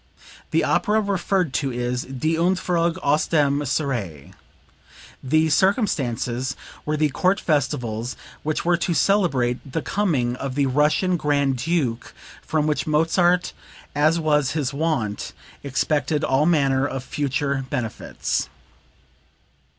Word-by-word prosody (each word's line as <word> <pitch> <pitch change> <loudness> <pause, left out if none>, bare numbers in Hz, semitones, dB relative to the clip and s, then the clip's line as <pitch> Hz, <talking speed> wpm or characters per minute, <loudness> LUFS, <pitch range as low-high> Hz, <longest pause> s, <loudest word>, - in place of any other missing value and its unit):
The - - +2
opera 215 +1 +2
referred 190 -6 0
to 135 -2 -2
is 125 +1 -2
"Die 135 +4 -2
Entfuhrung 170 0 +1
aus 150 +2 +2
dem 145 -3 +2
Serail." 120 - -3 0.9
The 155 +4 +2
"circumstances" 130 - +1 0.3
were 155 0 0
the 155 0 +2
court 185 +7 +1
festivals 125 -6 -1 0.3
which 155 +2 -2
were 175 0 +3
to 170 0 -1
celebrate 140 -10 +1
the 160 - -1
coming 145 -12 0
of 135 -1 -4
the 140 -1 +2
Russian 150 +7 +2
Grand 140 -3 +1
Duke, 130 -5 -2 0.3
from 155 -1 0
which 150 0 -1
Mozart, 175 +3 +2 0.4
as 155 +3 +3
was 150 -3 +1
his 150 -3 -1
wont, 140 -9 -2 0.3
expected 145 +2 0
all 140 +3 +2
manner 140 -5 +2
of 135 -2 -5
future 140 -1 -2
benefits.) 120 -6 -3
145 Hz, 120 wpm, -23 LUFS, 130-165 Hz, 0.9 s, were